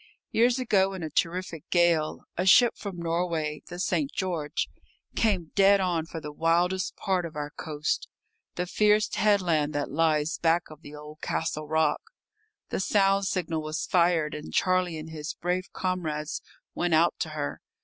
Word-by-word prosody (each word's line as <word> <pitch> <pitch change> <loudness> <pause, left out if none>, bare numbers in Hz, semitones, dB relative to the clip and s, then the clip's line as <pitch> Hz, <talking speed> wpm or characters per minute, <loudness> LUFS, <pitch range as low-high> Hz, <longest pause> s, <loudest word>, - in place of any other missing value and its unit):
Years 240 +2 +3
ago, 195 -6 +2
in 185 -3 -6
a 155 - -4
terrific 170 0 -2
gale, 170 -3 +2
a 180 - 0
ship 240 +5 +6
from 200 -4 -7
Norway, 165 -3 -1
the 175 - -8
St. 275 +10 0
George, 170 -6 -2 0.5
came 190 -8 +1
dead 200 0 +5
on 175 -4 0
for 165 - -6
the 150 -1 -7
wildest 175 +4 +1
part 185 -2 0
of 165 -2 -7
our 150 0 -4
coast, 150 -1 -3 0.5
the 180 - -1
fierce 210 +3 +2
headland 175 -7 +2
that 145 - -2
lies 155 0 +1
back 165 0 +1
of 155 0 -12
the 145 -1 -11
old 150 +1 -11
Castle 155 -1 -2
rock. 160 +1 +1 0.7
The - - -2
sound 195 0 +3
signal 170 -4 -1
was 155 +1 -3
fired, 170 -4 +2
and 150 0 -7
Charlie 185 -3 +1
and 155 +1 -8
his 155 0 -5
brave 180 +2 -2
comrades 160 -5 -3 0.3
went 175 -2 +1
out 165 +2 +4
to 160 - -2
her. 145 -1 -3
170 Hz, 165 wpm, -27 LUFS, 155-185 Hz, 0.7 s, ship